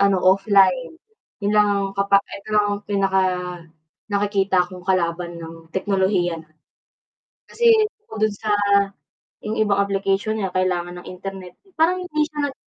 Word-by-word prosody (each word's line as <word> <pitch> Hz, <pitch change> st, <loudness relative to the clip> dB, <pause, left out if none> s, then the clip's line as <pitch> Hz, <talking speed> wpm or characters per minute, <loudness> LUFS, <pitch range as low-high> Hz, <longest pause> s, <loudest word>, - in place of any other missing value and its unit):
ano 200 Hz, -1 st, +4 dB
offline. 195 Hz, -, +3 dB, 0.5 s
Yun 205 Hz, -, +1 dB
lang 210 Hz, 0 st, +5 dB
ang 200 Hz, -1 st, +1 dB
kapa 200 Hz, 0 st, +3 dB, 0.2 s
eto 215 Hz, -, -17 dB
lang 205 Hz, -1 st, +1 dB
pinaka-nakikita 190 Hz, 0 st, -1 dB
kong 180 Hz, -, -9 dB
kalaban 175 Hz, -1 st, 0 dB
ng 165 Hz, 0 st, -10 dB
teknolohiya. 190 Hz, -4 st, 0 dB, 1.1 s
Kasi 470 Hz, -1 st, +3 dB, 0.3 s
bukod 215 Hz, -, -1 dB
dun 210 Hz, -, -6 dB
sa 215 Hz, +1 st, -3 dB, 0.9 s
yung 215 Hz, +1 st, -4 dB
ibang 205 Hz, -2 st, +2 dB
application 200 Hz, +2 st, 0 dB
niya 195 Hz, -4 st, -3 dB
kailangan 180 Hz, -1 st, -1 dB
ng -, -, -12 dB
internet, 185 Hz, -1 st, -8 dB, 0.2 s
parang 360 Hz, +3 st, +2 dB
hindi 305 Hz, -3 st, -1 dB
siya 290 Hz, -2 st, -3 dB
195 Hz, 130 wpm, -22 LUFS, 180-210 Hz, 1.1 s, lang